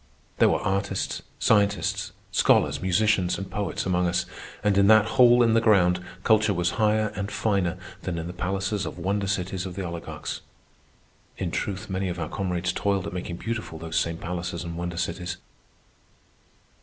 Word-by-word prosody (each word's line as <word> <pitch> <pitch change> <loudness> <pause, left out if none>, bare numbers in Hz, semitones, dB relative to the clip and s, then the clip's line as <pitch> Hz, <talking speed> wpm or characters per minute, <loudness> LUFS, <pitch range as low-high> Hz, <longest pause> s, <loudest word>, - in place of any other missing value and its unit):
There - - +6
were - - +2
artists, 95 0 -1 0.2
scientists, 100 -2 +2 0.2
scholars, - - +3
musicians, 95 0 +2
and 95 +1 -6
poets 100 -1 -2
among 90 -1 +1
us; 90 +1 0 0.4
and 105 -2 +3
in 100 0 +5
that 110 0 +7
hole 125 -2 +7
in 115 -1 +3
the 115 - +4
ground 90 -5 +4 0.2
culture 110 -2 +3
was 90 0 +1
higher 110 0 +3
and 100 0 -3
finer 95 -5 0 0.2
than 90 -2 -3
in 80 - -3
the 90 - -6
palaces 95 +1 -2
of - - -7
wonder 100 +3 -1
cities 95 -1 -2
of 90 - -8
the 95 -1 -3
oligarchs. 85 -1 -5 1.0
In - - -2
truth, 100 +2 -3
many 95 -1 -2
of 90 - -4
our 75 - -3
comrades 90 -2 -1
toiled 100 -2 0
at 100 - -5
making 90 -1 -4
beautiful 110 -7 -4
those 80 0 -6
same 85 0 -1
palaces 85 0 -4
and 85 -1 -6
wonder 85 0 -4
cities. 90 +1 -3
95 Hz, 170 wpm, -26 LUFS, 90-105 Hz, 1.0 s, that